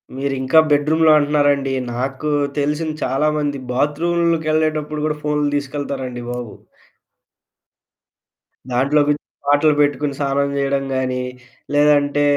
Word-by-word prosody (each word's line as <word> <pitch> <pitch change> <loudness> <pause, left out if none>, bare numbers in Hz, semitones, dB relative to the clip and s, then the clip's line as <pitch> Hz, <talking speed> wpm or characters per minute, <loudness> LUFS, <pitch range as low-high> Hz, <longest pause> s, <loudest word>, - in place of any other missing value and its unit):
మీరింకా 135 +2 +2
బెడ్‌రూమ్‌లో 155 +2 +3
అంటున్నారండి, 145 -2 +1 0.2
నాకు 135 +4 -3 0.3
తెలిసిన 150 +2 -1
చాలామంది 145 +1 0
బాత్రూమ్లకి 160 +4 0
ఎళ్ళేటప్పుడు 155 -1 -1
కూడా 150 -1 -2
ఫోన్లు 150 -1 0
తీసుకెళ్తారండి 135 -3 -4
బాబు. 125 -3 -6 2.2
దాంట్లోకి 145 +4 +2 0.3
పాటలు 145 +2 +4
పెట్టుకొని 145 0 0
స్నానం 140 0 0
చేయడం 140 0 0
గాని, 130 -1 -1 0.5
లేదంటే 145 0 +3
145 Hz, 90 wpm, -19 LUFS, 135-150 Hz, 2.2 s, పాటలు